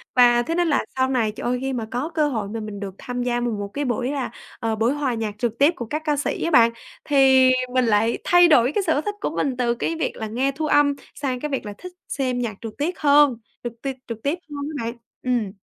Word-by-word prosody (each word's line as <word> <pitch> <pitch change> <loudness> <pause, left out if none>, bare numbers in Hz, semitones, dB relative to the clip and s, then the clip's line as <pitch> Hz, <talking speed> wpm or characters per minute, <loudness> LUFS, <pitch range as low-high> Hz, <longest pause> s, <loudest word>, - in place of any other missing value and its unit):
và 240 -1 +6
thế 330 +7 -2
nên 350 0 +2
là 290 -4 +1
sau 260 0 +2
này, 235 -5 +1
trời 210 - -9
ơi, 250 +1 +1
khi 270 0 -2
mà 230 -3 -3
có 255 +6 -2
cơ 305 -2 +2
hội 220 -8 -3
mà 225 +2 -4
mình 210 -2 -6
được 195 -2 -6
tham 245 -1 -4
gia 240 -1 0
mà 240 -1 -1
một 205 -1 -3
cái 290 0 -2
buổi 250 +1 -1
là, 275 -3 -3 0.3
ờ, 225 -1 -1
buổi 225 +4 +1
hòa 285 -4 -1
nhạc 220 -3 -3
trực 235 -1 -2
tiếp 290 +5 +5
của 240 - -5
các 305 +8 -3
ca 295 -1 +1
sĩ 290 - -2
á 335 - 0
bạn, 235 -4 +6 0.3
thì 265 -2 +5 0.2
mình 255 -1 +3
lại 225 +1 +2
thay 350 0 +6
đổi 250 -5 +5
cái 410 - +2
sở 315 -3 +1
thích 415 +3 -4
của - - 0
mình 260 -3 -1
từ 240 -2 +1
cái 330 +7 -2
việc 325 - -2
là 220 - -4
nghe 255 +6 0
thu 305 +3 -3
âm 290 -1 +3 0.2
sang 260 -3 -2
cái 300 - -3
việc 270 -5 -3
là 205 - -5
thích 365 - -9 0.2
xem 255 -3 -1
nhạc 235 -4 -2
trượt 225 -2 -6
tiếc 325 +5 -2
hơn 290 -3 +5 0.3
trực 240 -1 -4
tiêp 270 -1 -3
trực 225 -2 -7
tiếp 295 +5 0
hơn 285 -1 -5
á 230 - -3
bạn. 230 - -3 0.3
Ừm. 240 -6 0
255 Hz, 270 wpm, -23 LUFS, 230-290 Hz, 0.3 s, và